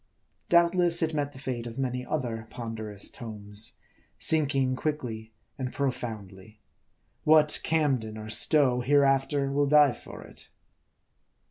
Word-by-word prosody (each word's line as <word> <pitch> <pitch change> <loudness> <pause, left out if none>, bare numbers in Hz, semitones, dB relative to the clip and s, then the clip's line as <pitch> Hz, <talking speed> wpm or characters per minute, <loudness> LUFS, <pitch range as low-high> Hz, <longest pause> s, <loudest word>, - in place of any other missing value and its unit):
Doubtless, 170 0 +4
it 160 0 -1
met 145 -1 -2
the 140 - -14
fate 125 -3 -5
of 115 +1 -9
many 125 -2 -2
other 120 -6 -4
ponderous 110 -3 -6
{pines; 105 -2 -4 0.4
sinking 140 -4 +2
quickly 120 -7 -4 0.3
and 130 -1 -3
profoundly. 110 -6 -5 0.6
What 150 -1 +4
Camden 135 -9 -1
of 110 0 0
Stowe 125 +2 +4
hereafter 140 +1 +2
will 145 +1 +1
dive 145 -4 +4
for - - -11
it? - - -13
130 Hz, 120 wpm, -27 LUFS, 110-145 Hz, 0.6 s, Doubtless